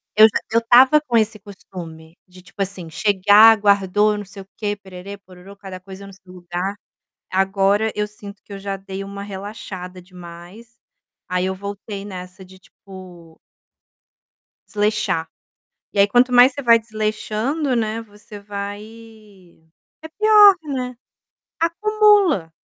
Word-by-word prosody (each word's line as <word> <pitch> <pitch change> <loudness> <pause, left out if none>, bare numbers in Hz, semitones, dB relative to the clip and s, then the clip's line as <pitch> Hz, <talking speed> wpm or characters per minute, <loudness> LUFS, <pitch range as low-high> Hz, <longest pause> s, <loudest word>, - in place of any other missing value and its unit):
eu 215 +1 +8
já 220 - -2
eu 230 +1 +2
tava 260 +5 +6
com 245 -6 -1
esse 215 -1 0
costume 170 -5 -12
de 185 0 -16
tipo 195 - -10
assim, 190 -4 -4
chegar, 205 +4 +5
guardou 205 +1 +2
não 205 - -8
sei 195 +1 -11
o - - -29
quê, 205 -1 -3
pererê, 195 0 -11
pororô, 190 0 -16
cada 190 -2 -10
coisa 190 +1 -12
no 195 - -13
seu 190 -1 -18
lugar. 180 +2 -5 0.6
Agora 195 +3 +1
eu 210 0 -2
sinto 205 -1 -13
que - - -14
eu 200 - -7
já 195 0 -5
dei 195 0 -8
uma 200 0 -8
relaxada 190 -2 -8
demais, 180 +6 -14 0.5
aí 180 0 -1
eu 190 - -2
voltei 200 +1 -7
nessa 185 -1 -10
de, 185 0 -17
tipo 180 -4 -15 1.3
desleixar. 210 -6 -1 0.6
E - - -5
aí 200 - +6
quanto 245 +3 +3
mais 245 +2 +6
você 280 - -7
vai 230 -2 +5
desleixando, 220 +6 -3
né, 225 -1 -2
você 210 -1 -14
vai 200 0 -6 1.2
é 320 - -9
pior, 420 +3 +6
né. 255 -4 -5 0.6
Acumula. 400 - +2
200 Hz, 145 wpm, -20 LUFS, 190-220 Hz, 1.3 s, eu